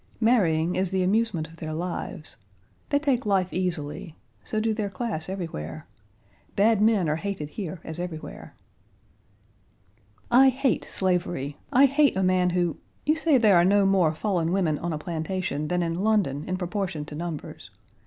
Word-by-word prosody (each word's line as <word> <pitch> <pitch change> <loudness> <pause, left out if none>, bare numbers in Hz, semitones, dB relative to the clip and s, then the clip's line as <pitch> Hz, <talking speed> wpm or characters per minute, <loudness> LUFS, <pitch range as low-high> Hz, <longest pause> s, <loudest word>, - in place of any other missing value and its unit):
Marrying 180 -8 +2
is 185 0 0
the 190 0 0
amusement 195 -4 +1
of 165 +1 -16
their 155 -1 -5
lives. 165 -6 -5 0.5
They 285 - +3
take 275 -4 +1
life 190 -3 +1
easily; 165 -3 -3 0.3
so 215 - -2
do 220 0 +1
their 210 -2 -2
class 195 -5 -4
everywhere. 80 - -5 0.7
Bad 210 +1 +3
men 215 -5 +3
are 150 +1 0
hated 165 -4 -4
here 180 0 -6
as 160 +1 -5
elsewhere. 175 -3 -7 1.8
"I 265 +2 +7
hate 265 -1 0
slavery. 175 -6 -1
I 270 +3 +6
hate 280 -4 +3
a 190 - +1
man 185 -1 +3
who 175 -2 0 0.3
You 305 +2 +3
say 320 -3 +3
there 215 -6 +5
are 170 - +5
no 200 +2 +4
more 190 -5 +3
fallen 170 -1 -1
women 175 -6 +1
on 170 - -3
a 155 - -2
plantation 160 -1 -3
than 180 +2 0
in 165 +1 -2
London 195 -9 +1
in 185 - -1
proportion 180 -4 -3
to 150 - -10
numbers. 165 0 -6
185 Hz, 165 wpm, -26 LUFS, 160-210 Hz, 1.8 s, I